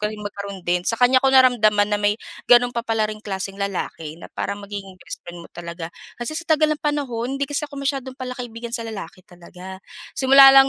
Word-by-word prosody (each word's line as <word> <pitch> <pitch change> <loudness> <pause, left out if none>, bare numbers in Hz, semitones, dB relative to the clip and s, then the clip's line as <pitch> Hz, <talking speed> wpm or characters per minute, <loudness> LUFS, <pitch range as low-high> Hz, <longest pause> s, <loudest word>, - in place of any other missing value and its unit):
ko 210 - +1
ring 215 0 -7
magkaroon 200 -2 -6
din. 175 0 +2
Sa 230 - +1
kanya 255 +2 +5
ko 270 - +4
naramdaman 235 -6 +5
na 205 - +2
may 205 0 +2 0.3
gano'n 245 0 +6
pa 235 - -1
pala 225 -2 0
ring 215 0 -4
klaseng 195 -1 -5
lalaki, 165 -5 -3
na 170 - -12
parang 200 0 -3
magiging 195 -2 -7
best - - -9
friend 175 -1 -8
mo - - -13
talaga. 170 -1 -7 0.2
Kasi 240 +5 -4
sa 335 - -15
tagal 305 0 +3
ng 300 - -5
panahon, 270 -4 -1
hindi 280 - 0
kasi 290 +1 -3
ako 285 - -11
masyadong 270 -2 -2
palakaibigan 245 -3 -6
sa 230 -2 -3
lalaki 200 -3 -7
talaga, 180 0 -11 0.4
simula 270 0 +9
lang 270 0 +9
225 Hz, 215 wpm, -22 LUFS, 195-260 Hz, 0.4 s, simula